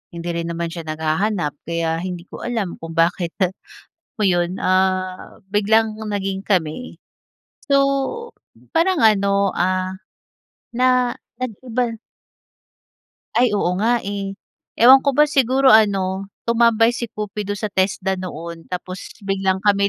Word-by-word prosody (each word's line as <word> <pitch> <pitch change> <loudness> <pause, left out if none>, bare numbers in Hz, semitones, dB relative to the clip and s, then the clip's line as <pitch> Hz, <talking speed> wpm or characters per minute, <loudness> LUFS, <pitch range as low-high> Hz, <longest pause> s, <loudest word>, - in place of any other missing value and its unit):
hindi 170 +1 -5
rin 170 0 -3
naman 170 0 -3
siya 165 -2 -7
naghahanap. 160 +2 -1 0.2
Kaya 165 -1 -1
hindi 180 -1 -5
ko 185 - -8
alam 220 -7 -3
kung 165 0 -8
bakit 170 +1 +1 0.8
mo 215 - -4
iyon, 175 -1 +1
ah, 185 0 0
biglang 215 +1 +2
naging 195 -1 -3
kami. 185 +4 -2 0.7
So, 275 - +5 1.0
parang 335 -5 +3
ano, 200 -2 +3
ah, 185 +1 0 0.8
na 250 0 +2 0.2
nag-iba. 240 -1 -3 1.4
Ay! 250 +1 +4
Oo 180 - +1
nga, 240 +2 +3
eh. 200 0 -3 0.5
Ewan 260 +3 +8
ko 280 - +2
ba 300 - +7
siguro 270 -2 +4
ano, 195 -3 +3 0.2
tumambay 230 0 +4
si 240 -1 -4
Kupido 205 -1 -4
sa 210 -1 -4
TESDA 190 0 0
noon 170 -2 -7
tapos 185 +1 -7
biglang 190 -1 0
kami, 200 -1 +3
195 Hz, 125 wpm, -20 LUFS, 180-225 Hz, 1.4 s, Ewan